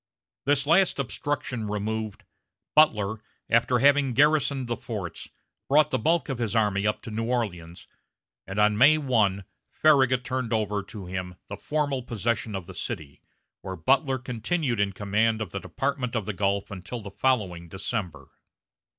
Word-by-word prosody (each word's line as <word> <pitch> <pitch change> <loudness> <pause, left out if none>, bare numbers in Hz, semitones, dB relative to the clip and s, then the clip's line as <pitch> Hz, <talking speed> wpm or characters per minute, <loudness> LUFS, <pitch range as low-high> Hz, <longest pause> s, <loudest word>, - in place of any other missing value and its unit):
This 140 0 +3
last 175 +5 +4
obstruction 130 -3 -3
removed, 105 +1 -3 0.5
Butler, 110 -8 +3 0.3
after 115 +2 +3
having 140 0 +4
garrisoned 145 0 +3
the 120 - -1
forts, 100 -9 -6 0.4
brought 150 +1 +4
the 130 - +1
bulk 165 +9 +1
of 135 -4 -3
his 115 -2 -1
army 105 -2 +2
up 105 - -1
to 115 - -7
New 115 +1 -2
Orleans, 90 -9 -3 0.6
and 95 - -6
on 105 0 +3
May 145 +5 +7
1 110 -9 +1 0.3
Farragut 130 -5 +3
turned 130 -2 -2
over 105 -2 0
to 100 0 -9
him 90 0 -5
the 100 - -4
formal 145 +1 -1
possession 115 -2 -2
of 95 -3 -5
the 95 - -10
city, 75 -4 -6 0.4
where 95 - -5
Butler 135 - +2
continued 125 +1 -2
in 100 -1 +2
command 110 +3 +1
of 105 -6 -4
the 100 - -3
Department 130 +1 -3
of 110 -4 -1
the 110 - -3
Gulf 100 +1 -1
until 100 +5 -6
the 100 -1 -9
following 100 -7 0
December. 95 0 -4
110 Hz, 160 wpm, -26 LUFS, 100-130 Hz, 0.6 s, May